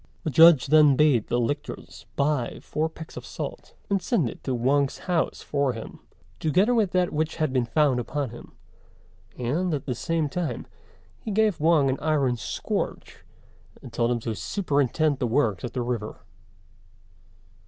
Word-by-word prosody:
The 155 - -2
Judge 160 -3 +7
then 150 -1 +6
bade 140 -6 +3
the 120 - 0
lictors 120 +5 -4
buy 140 -4 0
four 155 +1 -2
pecks 160 0 -11
of - - -6
salt, - - -7
and 200 -2 0
send 175 - +1
it - - -15
to 130 - -1
Wang's 135 +3 +1
house 175 -3 -1
for 140 -3 0
him, 115 -1 -9 0.4
together 185 +10 +2
with 220 -5 +2
that 180 -1 +1
which 155 +1 -1
had 155 -4 -1
been 125 -2 +1
found 140 -1 +2
upon 135 +1 -3
him; 120 - -12 0.8
and, 155 +8 -1
at 140 - -6
the 130 - -2
same 160 +6 -1
time, 150 -5 -3 0.5
he - - -7
gave 210 -3 +2
Wang 155 -2 +4
an 130 0 -1
iron 145 -5 +1
scourge, 115 - -4 0.6
and 120 - -11
told 115 0 +1
him 120 -1 0
to 115 0 -3
superintend 145 - 0
the 125 - 0
works 115 -6 +1
at 120 - -5
the 125 - -2
river. 120 -3 -4
145 Hz, 165 wpm, -25 LUFS, 125-160 Hz, 0.8 s, Judge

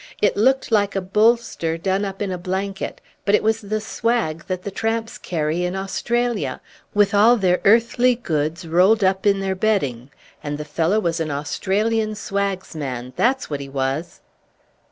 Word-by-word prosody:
It 205 - +2
looked 260 +4 +2
like 205 -2 +2
a - - +2
bolster 210 -4 +1
done 190 +3 0
up 195 +1 -4
in 195 - -3
a 180 - -2
blanket; 190 +2 -3 0.2
but 200 - +4
it - - +1
was 220 +1 +1
the 215 +1 -2
swag 220 -7 -1
that 185 -2 -3
the 200 - -4
tramps 225 +2 -2
carry 160 0 -1
in 180 +1 -2
Australia, 205 - -1 0.4
with 205 -1 +3
all 220 +4 +6
their 180 -3 +2
earthly 235 +3 +4
goods 165 -5 -2
rolled 190 +6 +4
up 190 +1 +2
in 200 -1 +3
their 190 -1 -1
bedding; 165 - 0 0.3
and 145 -1 -3
the 150 - -6
fellow 165 +7 +1
was 170 -4 -1
an 160 -1 -2
Australian 210 +9 -1
swagsman, 170 - -3
that's 260 +2 +1
what 145 -2 -4
he 140 -1 -7
was!" 135 +5 -3
195 Hz, 170 wpm, -21 LUFS, 165-215 Hz, 0.4 s, all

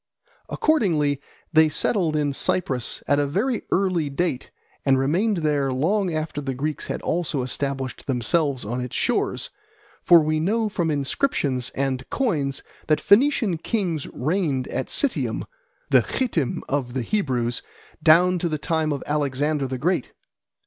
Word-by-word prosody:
Accordingly 160 - +1 0.3
they 160 0 +6
settled 165 0 0
in 145 -2 +1
Cyprus 130 -4 -1
at 145 - +3
a 145 - +1
very 220 - 0
early 180 -6 +1
date 140 -2 -2 0.3
and 135 -1 +4
remained 180 +11 +1
there 145 -3 +1
long 180 +9 +1
after 155 -2 -3
the 135 -2 -3
Greeks 150 +3 -3
had - - -4
also 160 -5 -1
established 135 0 -3
themselves 135 +1 0
on 120 +4 -3
its 125 -1 -5
shores; - - 0 0.5
for 170 -1 +7
we 155 0 0
know 215 +6 +1
from 175 -5 -1
inscriptions 140 - 0
and 135 -1 -2
coins 150 - -1 0.2
that 155 - +3
Phoenician 210 - +3
kings 175 - -2
reigned 145 -3 -1
at 130 - -2
Citium, 285 -4 -1 0.5
the - - +7
Chittim 180 - -1
of 130 -3 -2
the 130 - -1
Hebrews, 125 - 0 0.4
down 180 +3 +5
to 170 - -1
the 155 - -1
time 155 +1 0
of 140 -2 -3
Alexander 145 0 0
the 130 0 -3
Great. 165 +1 -1
150 Hz, 145 wpm, -23 LUFS, 135-180 Hz, 0.5 s, for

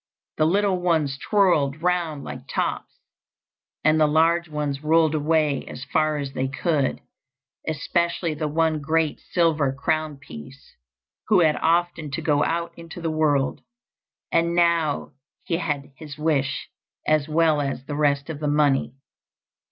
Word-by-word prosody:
The 155 - +3
little 195 +1 +2
ones 160 -6 +1
twirled 165 -8 +2
round 175 -5 0
like - - -8
tops, - - -2 0.9
and 155 +1 +3
the 155 - +5
large 165 +2 +2
ones 150 -2 -3
rolled 160 0 +3
away 155 -2 +1
as 130 - -7
far 155 -1 0
as 140 -2 -4
they 130 0 -1
could, 140 0 -1 0.7
especially 170 +2 -1
the 155 0 -3
one 160 0 +1
great 160 +1 0
silver 160 -5 +1
crown 155 +2 -1
piece 135 - -12 0.5
who 205 -4 +5
had 155 -2 +4
often 170 -2 +1
to 135 - -4
go 145 -2 +2
out 170 0 -2
into 165 0 -10
the 165 -2 -2
world, 150 -3 +1 0.7
and 170 +1 +2
now 170 -4 +1 0.3
he 165 - -1
had 145 -5 -3
his 150 +1 -10
wish 150 -3 0 0.4
as 155 -1 +2
well 155 -1 +3
as 135 -2 -3
all - - -28
the 145 - -5
rest 140 -2 +1
of 160 -3 -6
the 150 - -2
money. 145 -3 +2
155 Hz, 150 wpm, -24 LUFS, 145-165 Hz, 0.9 s, the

